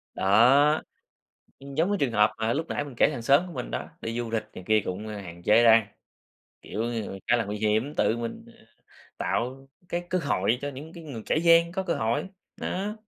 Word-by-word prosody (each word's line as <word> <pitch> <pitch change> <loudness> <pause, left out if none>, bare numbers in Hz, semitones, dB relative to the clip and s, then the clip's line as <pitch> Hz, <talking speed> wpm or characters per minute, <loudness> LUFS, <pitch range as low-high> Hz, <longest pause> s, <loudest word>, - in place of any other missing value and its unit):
Đó, 130 +10 +5 0.8
ừm, 140 0 -10
giống 165 +6 +1
như 205 - +2
trường 130 -5 +1
hợp 105 -1 +4
mà 110 +1 0
lúc 160 +5 -2
nãy 145 - -2
mình 140 - -10
kể - - +5
hàng 125 -6 -5
xóm 140 +9 +4
của 175 - -9
mình - - -5
đó, - - -4
đi 115 +1 -4
du 120 -1 -3
lịch 110 -1 0
này 90 - -9
kia 110 0 +4
cũng 95 +4 -5
hạn 90 -5 -8
chế 105 +5 +5
đăng, 115 -2 +6 0.8
kiểu, - - -6
ngư 115 -4 -4
khá 120 - +5
là 115 - 0
nguy 105 +1 -4
hiểm. 110 +7 0
Tự 110 - +2
mình, 115 -1 -5
ờ, - - -19 0.5
tạo 130 +3 -2 0.2
cái 175 0 -3
cơ 185 - +1
hội 125 - 0
cho 145 - -2
những 145 +4 -9
cái 170 -1 -11
ng 125 -8 -7
kẻ - - +1
gian 170 0 +5
có 190 - -2
cơ 175 -3 -1
hội, 115 +11 -1 0.3
đó. 200 +3 -3
120 Hz, 220 wpm, -26 LUFS, 110-155 Hz, 0.8 s, đăng